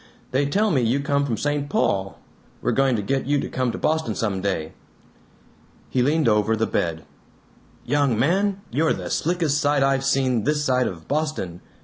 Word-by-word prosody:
They 140 +2 +1
tell 205 +8 +1
me 135 -6 +2
you 120 +4 +1
come 140 0 0
from 115 -4 -1
St. 145 -1 -1
Paul. 95 -7 0 0.4
We're - - 0
going 135 -2 +2
to 105 - -2
get 135 +4 -1
you 145 0 +2
to - - -3
come 130 -2 -1
to - - -5
Boston 155 -9 0
some 100 -4 -1
day." 85 -5 -2 1.2
He 130 - +2
leaned 150 +3 +2
over 105 0 +3
the 110 0 0
bed. 80 -5 -2 0.8
"Young 140 -3 +1
man, 190 - +1
you're 155 +6 +2
the - - -6
slickest 160 -3 0
sight 145 -2 +2
I've 135 0 +2
seen 130 -4 +1
this 150 0 0
side 125 -2 +2
of 80 -3 -7
Boston. 145 - -2
135 Hz, 180 wpm, -23 LUFS, 110-145 Hz, 1.2 s, over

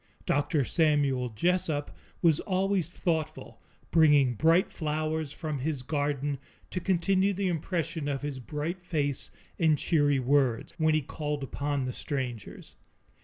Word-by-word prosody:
Dr. 145 0 +1
Samuel 145 -5 +2
Jessup 155 - 0 0.3
was 160 -3 +5
always 190 -3 0
thoughtful, 160 -3 -3 0.3
bringing 145 -6 +5
bright 165 - +3
flowers 155 -1 -2
from 155 -3 -4
his 140 -1 -2
garden 145 -1 -1 0.3
to 185 - -2
continue 190 +2 +2
the 195 0 -1
impression 165 -2 -2
of 140 -1 -2
his 145 -3 -4
bright 150 +7 -4
face 145 -6 -2 0.3
and 160 -3 +4
cheery 145 -3 +2
words, 130 -2 +1
when 155 -1 +3
he 155 - +2
called 150 0 -3
upon 140 0 -2
the 125 - -3
strangers. 125 -7 -5
150 Hz, 130 wpm, -29 LUFS, 140-165 Hz, 0.3 s, was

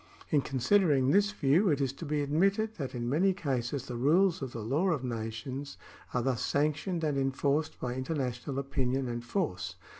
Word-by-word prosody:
In 145 - +4
consider 150 +8 +2
ing 135 -1 +3
this 205 +3 +4
view 175 +2 +3
it 145 -3 +2
is 135 -2 0
to 165 - -8
be 150 -1 0
admitted 195 +9 +1
that 135 -5 -4
in 120 -1 -3
many 175 +9 +3
cases 135 - -2
the 125 - -6
rules 165 +9 +3
of 130 -2 -4
the 115 - -6
law 145 - +1
of 150 -7 0
nations 120 +4 -5 0.3
are 125 - 0
thus 130 -3 0
sanctioned 155 +4 0
and 145 -3 +1
enforced 140 +3 0
by 125 -1 -2
international 130 -1 -3
opinion 135 -1 -1
and 120 0 -4
force. 95 - -2
140 Hz, 185 wpm, -30 LUFS, 125-160 Hz, 0.3 s, In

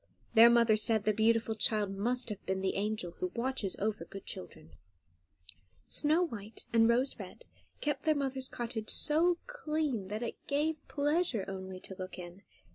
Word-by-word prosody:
Their 230 +1 +9
mother 235 -2 +5
said 215 0 +3
the 215 - +2
beautiful 225 +1 +2
child 215 -2 +2
must 240 +5 -1
have 205 -2 -6
been 190 0 -1
the 190 - 0
angel 210 -3 -2
who 365 -1 -2
watches 235 -5 -1
over 215 +1 -2
good 195 - -10
children. 80 -2 -6 1.2
Snow 310 +4 +2
White 220 - -7
and 225 0 +5
Rose 250 +3 +2
Red 485 - -10 0.4
kept 295 -2 -1
their 310 -1 +2
mother's 265 -2 -1
cottage 230 -2 -5
so 335 +3 +3
clean 305 - -2
that 210 +4 -4
it 235 - -7
gave 300 +2 0
pleasure 290 - 0
only 190 -1 -6
to 190 - -5
look 185 0 -6
in. 180 +1 -9
230 Hz, 165 wpm, -32 LUFS, 205-285 Hz, 1.2 s, Their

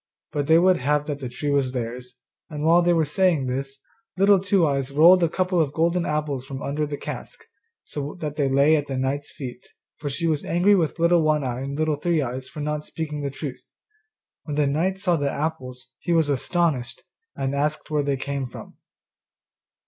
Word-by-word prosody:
But 145 -1 -2
they 160 0 +6
would 180 +1 +4
have 145 +3 +1
that 145 -2 -4
the 130 -3 -5
tree 145 +4 -3
was 135 -2 +1
theirs; 125 0 -5 0.3
and 150 -2 -5
while 165 +2 +5
they 175 0 +3
were 165 -2 +3
saying 160 -2 +2
this, 135 +2 -3 0.4
Little 195 +1 +5
Two 195 -2 +2
eyes 135 -2 0
rolled 165 +6 +6
a 170 - +3
couple 180 0 +1
of 145 -2 -1
golden 170 +2 +1
apples 150 -4 -2
from 135 0 -7
under 150 +2 -1
the 145 0 -4
cask, - - -8 0.4
so 145 +3 -6
that 150 -2 -4
they 140 -3 +1
lay 140 +4 +4
at 145 -1 -1
the 135 - -3
knight's 135 +2 -2
feet, 125 -3 -8 0.3
for 145 - -4
she 165 +5 -2
was 155 -3 0
angry 180 +4 +3
with 170 -5 +1
Little 170 0 +4
One 155 -2 +2
eye 125 -1 -3
and 140 +1 -4
Little 155 -1 +1
Three 170 +2 +1
eyes 130 -1 -4
for 150 - -7
not 150 0 -2
speaking 150 -2 -5
the 140 - -2
truth. 140 -1 -6 0.8
When 150 - -4
the 150 0 +2
knight 165 +7 0
saw 180 -3 +1
the 145 -2 0
apples 135 -5 -4
he 175 - -1
was 160 -3 +3
astonished, 140 -3 0 0.3
and 135 0 -2
asked 150 +2 -1
where 150 -1 +2
they 140 -1 -1
came 140 0 -3
from. 120 - -11
150 Hz, 205 wpm, -24 LUFS, 135-165 Hz, 0.8 s, they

